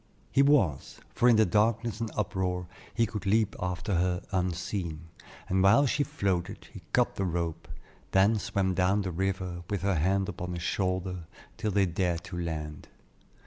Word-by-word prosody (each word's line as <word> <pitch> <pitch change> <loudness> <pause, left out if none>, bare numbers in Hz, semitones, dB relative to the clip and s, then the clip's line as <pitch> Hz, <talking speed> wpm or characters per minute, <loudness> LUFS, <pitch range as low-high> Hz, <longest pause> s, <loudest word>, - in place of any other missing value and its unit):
He 135 - +4
was, 140 - +2
for 120 +2 +4
in 120 - +6
the 110 0 +5
darkness 110 +4 +1
and 115 -1 -2
uproar, 90 -3 -1 0.3
he 115 - +2
could 105 -1 -5
leap 105 +1 +2
after 90 +3 -2
her 90 0 +1
unseen, 90 -3 -2 0.4
and 95 +1 +1
while 100 +9 +6
she 140 +2 +1
floated, 95 -9 -2
he - - -9
cut - - +2
the 100 - 0
rope, 85 -2 -3 0.4
then 100 +3 +4
swam 95 -2 0
down 95 +3 +2
the 95 - -3
river 95 0 -2
with 100 -3 -2
her 100 0 +2
hand 95 +5 +1
upon 90 -2 -5
his 85 -1 -5
shoulder 90 -2 -1 0.3
till 110 -1 -2
they 100 -1 +3
dared 85 -1 -1
to 90 - -7
land. 75 -3 -5
95 Hz, 170 wpm, -29 LUFS, 90-105 Hz, 0.4 s, in